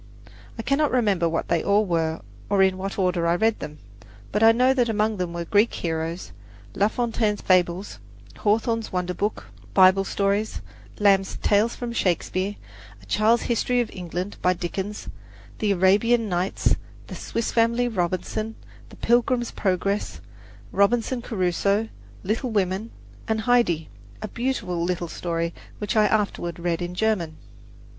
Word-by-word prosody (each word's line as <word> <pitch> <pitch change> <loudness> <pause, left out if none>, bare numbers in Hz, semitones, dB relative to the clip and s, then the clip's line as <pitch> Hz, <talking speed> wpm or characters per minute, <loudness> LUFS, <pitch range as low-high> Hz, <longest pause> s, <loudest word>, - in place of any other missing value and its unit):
I 225 - -4
cannot 280 +3 +2
remember 205 -9 +2
what 165 - -2
they 170 -2 +1
all 205 +1 +3
were, 165 -3 -1 0.3
or 200 -1 +4
in 190 -1 +3
what 195 +1 -4
order 180 -3 +1
I 170 - +3
read 220 +4 +1
them; 150 0 -7 0.5
but 210 - 0
I 225 0 +8
know 250 +3 +4
that 245 -3 +1
among 215 0 +1
them 180 -2 -2
were 170 0 -4
"Greek 210 +5 +3
Heroes," 165 +1 -3 0.4
La 200 - +3
Fontaine's 220 -3 -1
"Fables," 185 +1 +1 0.4
Hawthorne's 225 +2 0
"Wonder 180 0 -1
Book," 210 +3 -3 0.2
"Bible 190 0 +6
Stories," 200 +2 -1 0.4
Lamb's 195 -2 +3
"Tales 215 +3 +3
from 240 -1 -5
Shakespeare," 185 0 0 0.4
"A 100 - -18
Child's 220 - +2
History 245 +1 +1
of 240 - -1
England" 180 +2 -5
by 180 - +3
Dickens, 190 +4 -5 0.5
"The 210 -2 +1
Arabian 205 +5 +3
Nights," 180 0 +1 0.3
"The - - -9
Swiss 230 - -3
Family 235 +1 +2
Robinson," 195 +2 -2 0.3
"The - - -13
Pilgrim's 240 0 +1
Progress," 195 +1 -1 0.5
"Robinson 235 +4 +2
Crusoe," 200 0 0 0.3
"Little 225 +6 -1
Women," 200 0 -1 0.4
and 220 0 0
"Heidi," 220 -9 +2 0.3
a - - -5
beautiful 200 -9 -2
little 175 0 -1
story 170 -1 -2 0.2
which 210 +2 -3
I 215 -1 +5
afterward 200 -5 -1
read 170 0 -1
in 175 0 -4
German. 180 -7 0
200 Hz, 145 wpm, -24 LUFS, 180-225 Hz, 0.5 s, I